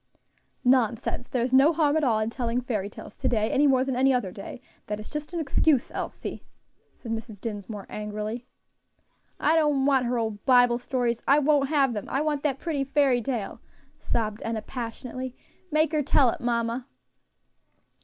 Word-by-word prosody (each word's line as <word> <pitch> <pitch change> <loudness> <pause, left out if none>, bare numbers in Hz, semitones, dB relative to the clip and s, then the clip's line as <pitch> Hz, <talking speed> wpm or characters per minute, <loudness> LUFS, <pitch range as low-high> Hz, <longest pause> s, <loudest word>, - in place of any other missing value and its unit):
"Nonsense! 245 -1 +1
there's 250 0 -1
no 275 +4 +7
harm 305 -3 +2
at 315 - +2
all 235 -5 +3
in 215 +1 -1
telling 240 -1 -1
fairy 215 -6 -2
tales - - -11
to - - -1
day, 220 -2 +1
any 290 +2 +4
more 260 -2 +4
than 265 -1 -2
any 265 +2 +4
other 245 -8 0
day; 195 +5 -8 0.3
that 210 0 -3
is 215 - -9
just 300 +1 -5
an 345 - -3
excuse, 290 -2 +2
Elsie," - - -5 0.5
said 230 - -8
Mrs. 225 -2 -5
Dinsmore, 205 -1 -6
angrily. 215 +3 -5 0.9
"I 315 - +3
don't 295 -4 +3
want 265 -3 +3
her 245 0 0
old 220 -3 -3
Bible 245 -2 +5
stories. 245 -2 -1
I 280 - +6
won't 290 -2 +3
have 275 -5 +3
them. 210 -3 -5
I 270 - 0
want 300 -2 0
that 285 -3 0
pretty 295 -3 -2
fairy 275 -3 +2
tale," 235 -5 -4 0.4
sobbed 215 -2 -2
Enna 225 -1 -3
passionately; 255 +1 -6 0.3
"make 310 +1 +2
her 305 -2 +1
tell 270 -3 +4
it, - - -7
mamma." 235 +1 -1
250 Hz, 175 wpm, -26 LUFS, 225-275 Hz, 0.9 s, no